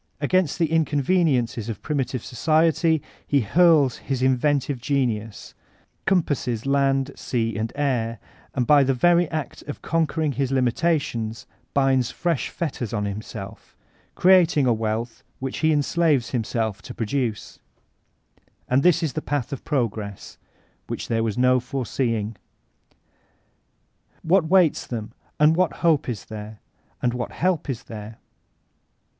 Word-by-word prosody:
Against 165 +2 +1
the 165 -3 0
inconveniences 145 - +1
of 110 - -6
primi* 145 -3 0
tive 130 -2 -6
society, 160 +3 +2 0.2
he 140 -2 +3
hurk 150 - +4
his 130 -2 -3
inventive 130 0 +1
genius,— 115 -6 -2 0.5
compasses 145 - 0
land, 135 0 +1
sea, 115 -3 -2
and 110 +2 -2
air, 125 -6 -1 0.2
— - - -29
and 125 - +1
by 145 +2 +6
the 135 0 +1
very 175 +5 +3
act 155 -5 -4
of 145 - -7
conquering 160 -1 0
his 135 -1 -1
limitations 125 -3 0 0.3
binds 135 -3 +3
fresh 170 -6 -1
fetters 130 -8 -4
on 105 -2 -1
himself, 100 +1 -7 0.4
creating 175 -6 +5
a 120 - +4
wealth 115 +1 -3 0.2
which 135 0 -4
he 160 0 +3
enslaves 150 -3 +1
himself 110 -4 -2
to - - -9
produce 115 -1 -3 0.8
I - - -32 0.3
And 130 - +5
this 170 0 +4
is 155 - -1
the 155 - -3
Path 145 -2 -2
of 135 - -6
Progress, 110 -8 -3 0.5
which - - -5
there 115 -1 +1
was 115 0 -2
no 125 0 +4
foreseeing! 120 -4 -2 1.9
What 175 +1 +3
waits 180 -3 +3
them? 110 -3 -5 0.3
And 150 +2 +5
what 180 0 +2
hope 155 -6 +3
is 115 -5 -5
there? 105 0 -8 0.4
And 120 -1 +2
what 125 -1 -4
help 180 -4 0
is 125 -4 -3
there? 110 0 -9
135 Hz, 140 wpm, -23 LUFS, 115-155 Hz, 1.9 s, by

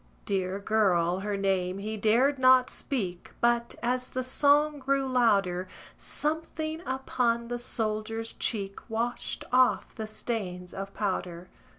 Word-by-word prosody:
Dear 190 -2 -1
girl, 190 -4 +2
her 205 +1 -2
name 190 -1 0
he 215 +2 -4
dared 240 +7 +3
not 255 0 +6
speak, 190 - -3
But, 235 0 +1
as 250 +1 0
the 255 - -2
song 290 +3 +3
grew 275 0 +1
louder, 200 -8 +2 0.3
Something 315 +1 -3
upon 240 -3 0
the 240 0 -2
soldier's 225 -1 -2
cheek 200 -4 -2
Washed 235 +2 -2
off 255 0 +3
the 220 -1 -5
stains 185 -5 -4
of 195 0 -5
powder. 185 -3 -3
225 Hz, 125 wpm, -28 LUFS, 195-255 Hz, 0.3 s, not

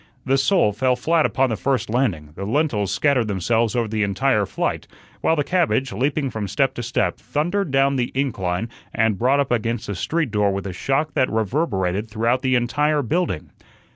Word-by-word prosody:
The 135 +1 +2
sole 135 - +3
fell 125 +4 +1
flat 160 +6 +2
upon 135 -2 +1
the - - 0
first 130 0 -1
landing; 105 - -1
the 95 - -7
lentils 110 - 0
scattered 135 -6 +2
themselves 110 +4 0
over 120 -2 +1
the 110 0 -2
entire 105 +1 +1
flight; - - -2 0.3
while 160 - +3
the 145 - +1
cabbage, 140 - +1
leaping 135 +5 -1
from 110 -2 -4
step 135 +7 +1
to - - -5
step, 120 +2 -1
thundered 175 +5 -1
down 135 0 +2
the 120 -1 -1
incline 105 -7 -1 0.3
and 110 -3 +1
brought 130 +4 +3
up 140 -3 0
against 115 0 -1
the 100 - -4
street 155 - -1
door 105 -1 +2
with 100 0 -3
a 95 - -4
shock 135 - -1
that 130 - +2
reverberated 110 - -1
through 115 +3 +1
the 130 -1 +2
entire 145 +5 +1
building. 165 - -2
120 Hz, 190 wpm, -22 LUFS, 105-140 Hz, 0.3 s, sole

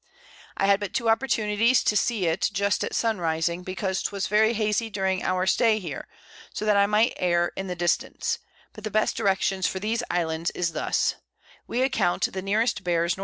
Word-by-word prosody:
I 195 - +1
had 200 0 +4
but 205 -3 -5
two 235 -3 +1
Opportunities 225 -1 +2
to 210 - +1
see 210 -2 +1
it 165 +2 +1
just 200 +1 0
at - - -3
Sun 225 -4 0
rising, 165 +1 -1
because 185 +1 -3
'twas 200 -1 -2
very 220 +2 +3
hazey 215 +1 0
during 190 -2 -1
our 185 0 0
Stay 220 +3 +3
here, 170 -9 -6 0.4
so 215 - -4
that 210 -1 +3
I 200 0 +4
might 215 +3 +3
err 175 -1 +1
in 195 - -4
the 180 - -3
Distance; 175 0 -1 0.3
but 215 - -12
the 215 - -3
best 215 +1 +1
Directions 190 -1 +1
for 190 - -3
these 220 +4 -1
Islands 165 -1 -1
is 170 -2 -1
thus: - - 0 0.5
We 250 +2 0
account 220 -9 +1
the 190 - -3
nearest 210 +1 0
bears 170 -1 +1
N.N. - - -14
195 Hz, 195 wpm, -25 LUFS, 180-215 Hz, 0.5 s, had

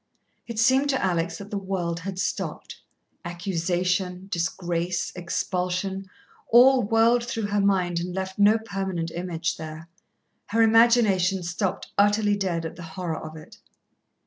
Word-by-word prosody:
It 230 -2 -6
seemed 260 +5 +3
to 265 -2 +1
Alex 170 -2 -1
that 200 0 -10
the 205 - -2
world 180 -3 -3
had 185 +2 -6
stopped. - - -4 0.4
Accusation, 180 +1 -2
disgrace, 175 0 -2
expulsion, 185 +2 -2 0.4
all 255 +2 +7
whirled 230 +2 +3
through 225 -3 -3
her 205 0 +1
mind 185 -3 +1
and 180 +1 -4
left 190 +1 -5
no 210 +2 +6
permanent 195 -6 -4
image 170 -2 -3
there. 160 +1 -8 0.6
Her 225 +2 +3
imagination 220 -5 +4
stopped 180 +2 -3
utterly 205 0 +3
dead 180 -5 -2
at 160 - -6
the - - -9
horror 165 -1 -5
of 155 0 -8
it. 155 - -14
190 Hz, 140 wpm, -25 LUFS, 175-205 Hz, 0.6 s, all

